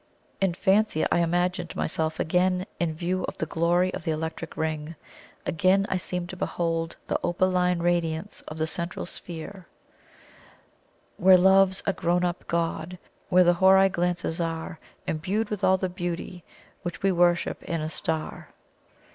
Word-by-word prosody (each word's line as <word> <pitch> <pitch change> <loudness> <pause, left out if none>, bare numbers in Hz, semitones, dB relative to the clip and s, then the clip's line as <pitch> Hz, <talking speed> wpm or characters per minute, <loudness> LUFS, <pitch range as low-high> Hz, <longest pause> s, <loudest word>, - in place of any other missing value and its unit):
In 190 -3 +2
fancy 195 -3 +2
I - - +3
imagined 175 +1 0
myself 160 0 -2
again 180 +2 +1
in 165 -2 -1
view 180 +3 -2
of - - -7
the - - -1
glory 175 +3 +1
of - - -5
the 165 - -2
Electric 160 +1 -4
Ring 160 0 -3 0.5
again 185 +4 +2
I 190 - +1
seemed 180 -1 -4
to 185 - -6
behold 165 -2 -2
the - - -1
opaline 180 -1 +1
radiance 175 +1 -1
of 155 - -7
the 160 - 0
Central 170 +2 -3
Sphere: 175 +2 -7 1.5
"Where 185 +1 +7
Love's 190 +1 +4
a 195 - +1
grown 175 0 0
up 175 0 -3
God, 170 +1 -2 0.3
Where 185 0 +6
the 175 0 +5
Houri 190 +2 +5
glances 175 -2 -1
are 165 -1 -4 0.3
Imbued 195 +8 -2
with 210 - -3
all 190 0 +5
the 185 - -1
beauty 175 -1 -5 0.4
Which 175 -1 -6
we 195 - +4
worship 175 -1 +2
in 165 - -3
a 155 - -2
star." 160 0 -3
175 Hz, 155 wpm, -26 LUFS, 165-185 Hz, 1.5 s, Where